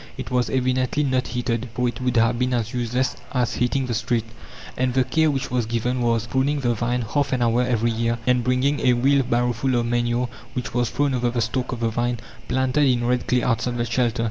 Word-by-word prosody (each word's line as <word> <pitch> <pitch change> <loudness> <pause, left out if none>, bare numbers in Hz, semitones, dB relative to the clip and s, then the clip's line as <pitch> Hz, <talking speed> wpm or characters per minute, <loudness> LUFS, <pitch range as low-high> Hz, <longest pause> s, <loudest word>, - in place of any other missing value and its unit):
It - - -6
was 125 -1 +1
evidently 130 +2 +1
not 130 -2 0
heated, 120 0 -2
for 125 -1 +1
it 120 0 -4
would 125 -1 0
have 115 +1 +3
been 125 0 +1
as 115 0 -2
useless 125 +1 -1 0.2
as 125 -2 +1
heating 125 +2 0
the 125 - -2
street! 115 0 0 0.5
And 130 0 0
the 130 - +4
care 160 +4 +2
which 135 -2 -2
was 125 -3 0
given 120 +2 -1
was: 115 -1 +1
pruning 135 +5 0
the 120 -2 +1
vine, 120 +2 -1
half 140 +6 -1
an 125 -2 +1
hour 120 +1 +2
every 120 -2 +1
year; 115 +1 0
and 125 -1 +2
bringing 130 +3 +1
a 125 - +3
wheel 135 +3 +3
barrowful 125 +1 0
of 120 -1 +1
manure, 120 +1 0 0.3
which 125 - -4
was 120 -1 +1
thrown 140 +2 0
over 125 -1 +1
the 120 0 -2
stalk 125 +3 -1
of 120 -2 -5
the 115 - +1
vine, 120 +1 -1 0.3
planted 130 +3 +2
in 120 -2 +2
red 125 0 0
clay 125 -1 +2
outside 120 +1 0
the 120 - 0
shelter. 120 0 0
125 Hz, 225 wpm, -23 LUFS, 120-130 Hz, 0.5 s, the